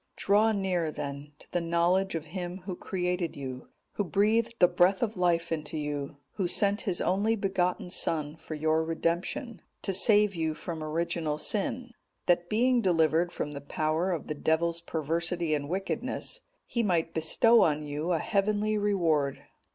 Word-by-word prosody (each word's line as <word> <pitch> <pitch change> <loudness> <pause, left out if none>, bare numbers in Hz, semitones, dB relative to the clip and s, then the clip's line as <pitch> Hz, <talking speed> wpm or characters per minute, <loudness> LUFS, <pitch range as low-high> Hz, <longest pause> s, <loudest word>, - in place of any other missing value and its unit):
Draw 215 +3 +3
near, 180 -5 0
then, 140 0 -6
to - - -17
the 175 - 0
knowledge 170 +3 +1
of 160 -1 -3
Him 180 +2 -6
Who 190 -2 -4
created 180 -2 -2
you, 130 -2 -7 0.2
Who 205 - -1
breathed 215 +5 +1
the 180 - +6
breath 180 +4 +3
of 220 -2 -1
life 175 -2 +1
into 155 -1 -3
you, 145 -1 -4 0.2
Who 190 -4 +1
sent 200 +3 +2
His 185 -3 -1
only 205 +5 +1
begotten 185 -3 -1
Son 155 -4 0
for 160 -1 -8
your 155 +1 +1
redemption, 175 - -2 0.2
to 195 - -1
save 205 +1 +5
you 160 -3 -1
from 165 -2 -5
original 160 -1 -1
sin, 240 +8 -2 0.3
that 175 0 +2
being 245 +3 +3
delivered 165 -2 +2
from 150 - -4
the 140 -1 -7
power 155 +5 -1
of 170 - -3
the - - -3
Devil's 165 +2 0
perversity 165 +1 -1
and 145 -1 -2
wickedness, 195 - -2 0.2
He 235 - -1
might 170 -6 0
bestow 225 +8 +4
on 150 -1 +2
you 150 +4 -3
a 170 - +3
heavenly 210 +3 0
reward. 165 -9 +1
175 Hz, 165 wpm, -29 LUFS, 160-195 Hz, 0.3 s, the